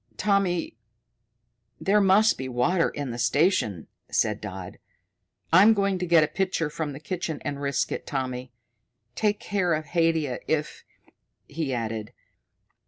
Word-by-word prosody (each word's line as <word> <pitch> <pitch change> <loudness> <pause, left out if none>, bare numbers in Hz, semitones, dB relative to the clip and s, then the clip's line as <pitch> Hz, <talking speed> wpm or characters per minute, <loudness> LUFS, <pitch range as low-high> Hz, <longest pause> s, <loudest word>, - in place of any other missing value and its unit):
"Tommy, 195 - +1 1.0
there 205 +2 +3
must 200 +3 +5
be 130 0 -5
water 165 +8 +2
in 140 -3 -5
the 120 - -6
station," 120 - +1 0.2
said 105 -1 0
Dodd. 95 -3 -7 0.7
"I'm 205 +6 +7
going 195 -2 +1
to 180 - -2
get 165 -2 +6
a - - +1
pitcher 185 -5 -1
from 150 -1 -4
the 140 - -8
kitchen 165 -1 -4
and 140 -1 -3
risk 140 -2 -1
it, - - -5
Tommy. 130 -2 -3 0.6
Take 210 - 0
care 180 -5 0
of 155 0 -4
Haidia 160 -4 0
if 155 -1 -2 0.3
" - - -55 0.3
he 150 -2 -3
added. 115 -3 -3
155 Hz, 145 wpm, -26 LUFS, 130-185 Hz, 1.0 s, I'm